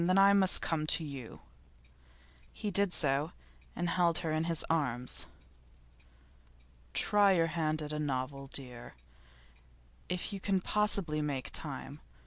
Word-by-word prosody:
Then 185 +1 +3
I 195 +1 +7
must 190 -2 +5
come 155 -2 -1
to 165 - +3
you.' 140 -6 -8 1.1
He 210 - -4
did 200 0 +3
so 145 +1 +1 0.4
and 175 - -1
held 170 -1 +2
her 160 - 0
in 155 +1 0
his 165 -1 0
arms. 125 -6 -1 1.7
'Try 205 -1 +4
your 165 -2 +3
hand 155 -2 0
at 150 0 -4
a 150 - -2
novel, 135 -1 -3
dear, 125 -3 -8 1.1
if 180 +3 -3
you 200 - -4
can 195 0 +1
possibly 190 -6 0
make 140 -3 -3
time. - - -5
160 Hz, 135 wpm, -32 LUFS, 145-185 Hz, 1.7 s, I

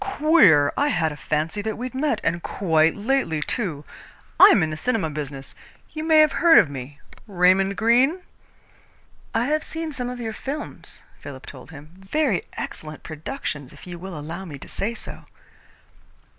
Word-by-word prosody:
"Queer! 305 - +4
I 290 - +2
had 165 - +1
a - - -7
fancy 155 +6 -2
that 220 0 -4
we'd 250 +1 -5
met, 285 +3 0
and 175 +1 0
quite 165 -4 +1
lately, 215 - 0
too. 155 - -3 0.5
I - - +11
am 195 - +5
in 155 - -1
the - - -3
cinema 205 -2 -1
business. 140 -2 -6 0.4
You 310 - -5
may 315 -1 +6
have 305 -2 +4
heard 335 +2 +5
of 145 - +5
me 140 +1 -8 0.3
Raymond 190 +1 +3
Greene?" 255 +10 +3 1.1
"I 230 +2 +2
have 305 +3 0
seen 320 -1 -4
some 250 -2 -3
of 250 0 -6
your 225 -2 -4
films," 280 +7 -5 0.2
Philip 135 -2 -10
told 130 0 -11
him. 150 -1 -12
"Very 200 - 0
excellent 155 -1 -6
productions, 155 - -6
if - - -14
you 175 -1 -8
will 185 -2 -7
allow 165 +5 -6
me 155 -7 -8
to - - -12
say 230 +4 -2
so." - - -10
190 Hz, 170 wpm, -23 LUFS, -, 1.1 s, I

